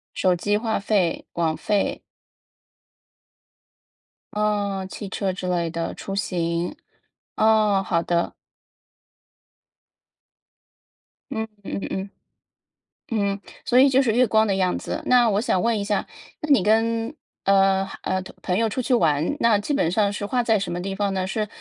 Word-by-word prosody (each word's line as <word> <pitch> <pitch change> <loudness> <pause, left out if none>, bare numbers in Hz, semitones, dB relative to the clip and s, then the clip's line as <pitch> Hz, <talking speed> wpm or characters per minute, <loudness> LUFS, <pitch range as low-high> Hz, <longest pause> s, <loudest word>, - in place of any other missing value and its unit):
手 180 -1 +2
机、 205 +4 0
话 220 -2 -1
费、 195 -4 0
网 165 -2 0
费。 200 +5 0 2.3
哦， 205 -2 0
汽 200 0 -7
车 190 -1 -2
之 185 0 -5
类 175 -2 0
的 165 0 -3
出 195 - -6
行。 170 -3 -1 0.6
哦， 215 -3 +3
好 170 -3 +1
的。 170 -1 0 3.0
嗯 220 -3 -2 0.2
嗯 195 - -4
嗯。 190 +1 -4 1.0
嗯， 200 -3 0 0.3
所 245 - +2
以 275 - +7
就 265 +1 +4
是 230 -5 +1
月 255 +2 +4
光 220 -1 +3
的 195 - +1
样 185 -2 +1
子。 - - -5
那 245 -2 +5
我 200 - +2
想 190 -5 +1
问 230 -1 +1
一 - - -2
下， 205 0 -1 0.3
那 305 - -5
你 265 -10 +5
跟， 225 +3 +1 0.3
呃， 195 0 +3
呃， 185 - -1
同 - - -12
朋 180 0 -1
友 225 - +2
出 235 +4 -2
去 250 - 0
玩， 160 - +2
那 230 -5 +4
基 205 - -4
本 170 - +1
上 200 +1 +2
是 205 0 -4
花 245 +4 +1
在 225 -2 +2
什 195 -3 -3
么 175 - -3
地 195 +1 -4
方 200 -1 -1
呢？ 185 -1 -1
是 210 +2 -2
200 Hz, 165 characters per minute, -23 LUFS, 185-220 Hz, 3.0 s, 以